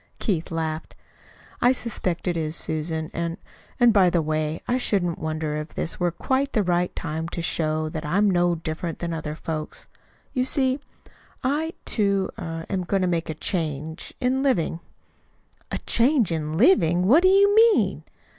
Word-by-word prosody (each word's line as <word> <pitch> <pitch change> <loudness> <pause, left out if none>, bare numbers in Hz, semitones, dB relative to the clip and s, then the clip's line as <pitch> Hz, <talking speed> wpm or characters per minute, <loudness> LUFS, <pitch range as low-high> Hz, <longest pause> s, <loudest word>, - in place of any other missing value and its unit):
Keith 175 -8 -1
laughed. 160 -1 -4 0.7
"I 245 - +5
suspect 190 -8 -2
it 175 - 0
is, 160 -1 0
Susan. 160 0 +1
And 170 0 -3 0.4
and, 240 -2 +6
by 190 -4 +5
the 170 -2 +1
way, 155 +1 -1
I 250 +1 +1
shouldn't 180 -8 0
wonder 155 -1 -3
if 150 +1 -7
this - - -2
were 175 -1 +2
quite 265 - -1
the 215 - +2
right 175 -1 0
time 160 0 -4
to 170 - -5
show 155 -1 0
that 155 0 -5
I'm 195 +7 +2
no 175 -2 +2
different 165 +1 -4
from 170 -1 -3
other 155 -2 -4
folks. 155 -1 -5 0.5
You 255 - +1
see, 265 0 +2 0.6
I, 305 +5 0
too, 200 -3 0
er 165 0 -5
am 190 -2 -2
going 190 +1 0
to - - +2
make 170 -2 -1
a 160 - -3
change 160 -2 -3
in 255 +1 +1
living." 185 - 0 0.9
"A - - -2
change 240 - +2
in 155 -1 -2
living! 180 - +4
What 270 - +6
do 370 - +5
you 400 +1 +5
mean?" 450 0 +4
175 Hz, 170 wpm, -24 LUFS, 160-235 Hz, 0.9 s, and